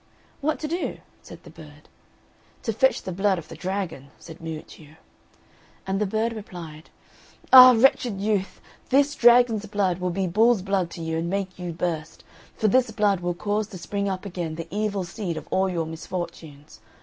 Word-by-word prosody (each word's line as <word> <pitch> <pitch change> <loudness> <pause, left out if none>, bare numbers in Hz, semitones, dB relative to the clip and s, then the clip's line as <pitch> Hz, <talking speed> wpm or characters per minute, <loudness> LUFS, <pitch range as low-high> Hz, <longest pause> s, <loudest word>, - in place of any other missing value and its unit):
"What 310 +1 0
to 305 - -2
do?" 340 +4 -3 0.2
said - - -13
the - - -13
bird. - - -15 0.8
"To 225 - -1
fetch 265 +5 +2
the 185 - -5
blood 195 +1 +1
of 155 -2 -9
the - - -9
dragon," 180 -8 -4
said 165 0 -12
Miuccio. 155 -1 -9 0.9
And 195 +1 -2
the 210 - +1
bird 220 +3 -1
replied, 170 -7 -9 0.6
"Ah, 255 -1 +11
wretched 240 -4 +3
youth! 200 -1 -1 0.3
this 280 +2 +3
dragon's 240 -4 +4
blood 195 -3 0
will 180 0 -1
be 190 +2 -1
bull's 215 +3 +3
blood 195 -3 0
to 170 - -8
you, 160 0 -2
and 170 +1 -3
make 190 -1 -3
you 175 -1 -4
burst; 165 -2 -4 0.3
for 215 - +1
this 250 +3 +3
blood 210 -3 +1
will 175 0 -2
cause 210 +3 -1
to 195 - -9
spring 200 +2 -3
up 190 +1 -4
again 175 -4 -4
the 165 0 -6
evil 205 -1 -1
seed 175 -1 -5
of - - -8
all 190 0 +2
your 170 -3 -2
misfortunes. 160 -4 -7
190 Hz, 180 wpm, -24 LUFS, 170-215 Hz, 0.9 s, Ah